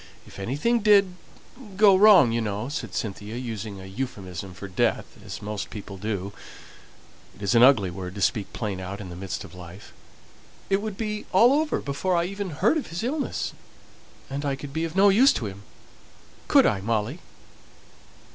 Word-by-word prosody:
If - - -13
anything 145 - 0
did 205 -3 +5 0.7
go 200 -2 +7
wrong, 185 - +7
you 115 0 0
know," 105 +3 -3
said 115 -9 -5
Cynthia, 105 +1 -4
using 110 -5 -5
a 95 - -10
euphuism 95 -4 -6
for 100 - -8
death, 95 - 0 0.2
as - - -8
most 105 -1 -4
people 100 -2 -8
do 100 -1 -3 1.0
(it 100 - -12
is 100 - +1
an 115 - +5
ugly 115 -8 +6
word 90 +1 -7
to 100 - -6
speak 105 0 0
plain 105 -5 -4
out 95 +2 -6
in 95 -3 -8
the 85 - -8
midst 95 +1 -5
of - - -12
life), 90 +2 -12 0.8
"it 195 +1 +3
would 215 -2 -5
be 210 -1 -4
all 235 +7 +6
over 305 +1 +1
before 140 +7 -1
I 170 - +2
even 195 +1 -4
heard 190 - +2
of - - -7
his 170 +5 -5
illness, 280 +4 -2 0.7
and 140 +2 -4
I 140 -1 -1
could 135 +1 -9
be 160 +2 -1
of 165 +1 -6
no 200 +1 +6
use 245 +8 +6
to 115 - -3
him 100 -1 -7 0.9
could - - +6
I, 95 - +1
Molly?" 115 - -1
115 Hz, 185 wpm, -25 LUFS, -, 1.0 s, go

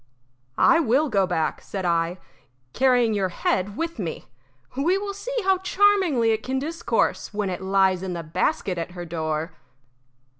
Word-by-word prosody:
"I 330 - +5
will 285 +1 +2
go 195 -4 +2
back," 165 -3 -1
said 190 -2 -5
I, 170 +1 0 0.6
"carrying 245 -3 +3
your 195 -3 0
head 190 +3 -1
with 330 -5 -3
me. 170 -5 -4 0.5
We 330 +8 +2
will 400 0 -4
see - - -6
how 380 -1 +3
charmingly 375 - +3
it 220 0 0
can 260 +3 -2
discourse 305 -6 -1
when 205 -2 -1
it 180 - -5
lies 190 -1 +2
in 190 -1 -4
the 170 -1 -5
basket 180 +2 -1
at 170 +2 -5
her 175 -1 -6
door." 160 -1 -3
205 Hz, 160 wpm, -24 LUFS, -, 0.6 s, I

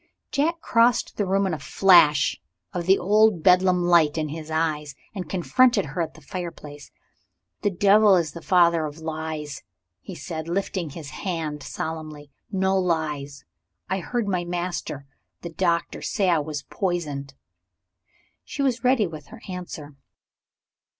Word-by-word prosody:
Jack 330 +4 0
crossed 230 +1 +2
the 205 - 0
room, 195 +1 +2
with 190 -3 0
a 155 - -3
flash 155 -7 +4 0.3
of 175 -1 -3
the 190 +1 +6
old 210 -2 +3
Bedlam 180 -1 +4
light 170 -3 +4
in 155 -1 -1
his 155 +1 -7
eyes, 155 -2 -1 0.2
and 190 -4 -6
confronted 210 +4 +3
her 150 +5 -4
at 160 -2 -4
the 160 - -15
fire 175 +4 -4
place. 145 -3 -12 0.7
"The 205 - +2
devil 200 +2 +5
is 165 -4 0
the 170 - -9
father 170 -3 +3
of 150 +1 -9
lies," 160 -2 -5 0.4
he 185 - -9
said, 160 +1 -6
lifting 180 -1 -2
his 145 0 -9
hand 160 -6 -4
solemnly. 155 -2 -6 0.2
"No 190 -1 +1
lies! 150 -6 -2 0.5
I 190 - +1
heard 235 +3 -2
my 180 -3 0
master 175 -5 -4 0.4
the 170 - -6
Doctor 170 -1 -1
say 195 -4 +1
I 165 - +3
was 150 -1 -4
poisoned." 150 -7 -3 1.1
She 280 - -4
was 255 -2 0
ready 250 -4 +3
with 155 -4 -8
her 230 -1 -13
answer. 165 -6 -7
170 Hz, 150 wpm, -24 LUFS, 155-190 Hz, 1.1 s, the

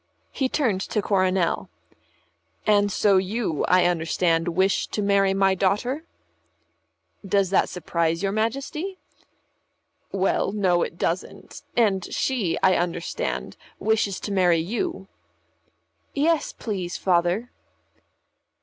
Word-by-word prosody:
He 265 -2 -1
turned 225 -12 0
to 210 - -2
Coronel. 185 - +1 1.0
"And 205 -1 +3
so 200 0 +3
you, 190 -3 -1
I 180 -1 +4
understand, 165 0 +1
wish 190 +3 +1
to - - -4
marry 195 -1 +3
my 195 0 +3
daughter?" 215 - 0 1.2
"Does 195 -1 +1
that 195 - +3
surprise 170 -1 -1
your 195 - +1
Majesty?" 275 - -2 1.1
"Well, 195 0 0
no, 185 -4 +2
it 170 - -3
doesn't. 175 +2 -4 0.2
And 200 -6 +3
she, 225 -11 0
I 185 -1 +5
understand, 170 - -3 0.2
wishes 210 -2 0
to 205 - -4
marry 180 -3 +3
you." 240 - -3 1.1
"Yes, 310 +2 +1
please, 190 -6 -4
Father." 180 +6 +1
195 Hz, 110 wpm, -24 LUFS, 175-215 Hz, 1.2 s, I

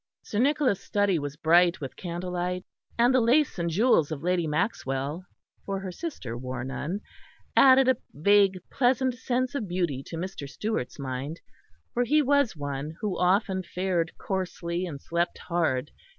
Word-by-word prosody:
Sir 210 - -3
Nicholas' 265 -6 +2
study 205 -4 +1
was 145 0 -5
bright 170 +3 +4
with 135 -3 -6
candlelight, 180 +1 -3 0.3
and 240 +2 +4
the 255 - +4
lace 250 -1 +3
and 170 0 0
jewels 170 - +3
of 150 -1 -4
Lady 175 -2 +1
Maxwell 150 - -2 0.4
(for 195 -1 -3
her 190 -1 -5
sister 180 - -5
wore 125 0 -5
none) 150 +9 -4 0.5
added 265 -1 +7
a 260 -2 +4
vague 195 +4 +4
pleasant 255 0 +2
sense 250 +1 -1
of 245 -8 -3
beauty 175 -7 -1
to 165 - -6
Mr. 170 -5 -5
Stewart's 210 - -3
mind; 140 +3 -4 0.5
for 245 - +2
he 300 +5 +3
was 280 -6 +2
one 145 +2 -4
who 205 -4 -1
often 190 +1 +2
fared 180 -2 -1
coarsely 180 -2 -3
and 145 -5 -6
slept 170 +4 -1
hard. 160 -6 -1
180 Hz, 155 wpm, -27 LUFS, 155-220 Hz, 0.5 s, added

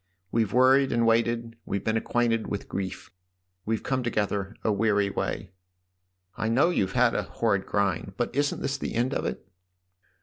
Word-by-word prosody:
We've 110 -3 +1
worried 130 +3 +5
and 115 -1 +2
waited 115 0 +1
we've 100 - -3
been 110 - 0
acquainted 115 0 +1
with 100 - -4
grief. 95 0 -5 0.6
We've 110 -1 -1
come 130 -1 0
together 105 -3 -1
a 110 - +2
weary 100 -1 +2
way." - - -3 0.4
" 90 0 -50
I 110 0 -1
know 140 +9 +4
you've 95 - 0
had 125 -1 +4
a - - +1
horrid 100 -4 -1
grind. 95 -2 0
But 120 - -2
isn't 145 0 0
this 135 0 -1
the - - -4
end 125 +4 +1
of - - -2
it - - -4
115 Hz, 175 wpm, -27 LUFS, 100-120 Hz, 0.6 s, worried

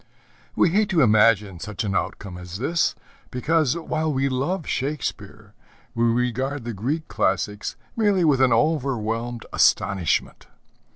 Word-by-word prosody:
We 170 - +4
hate 205 +4 +2
to 170 -7 +3
imagine 105 -4 +3
such 105 +3 -5
an 100 -2 -2
outcome 95 -2 -3
as 90 0 -8
this, 155 +7 0 0.3
because, 155 +3 +1
while 160 -1 -2
we 135 0 0
love 145 +7 -2
Shakespeare, 110 -7 -4 0.4
we 115 -1 +1
regard 125 +3 0
the 120 0 -4
Greek 140 +11 -3
classics 105 +2 -1 0.2
merely 205 -5 +2
with 140 -4 +3
an 130 -2 +4
overwhelmed 120 -4 0
astonishment. 95 -4 +1
125 Hz, 130 wpm, -23 LUFS, 105-155 Hz, 0.4 s, We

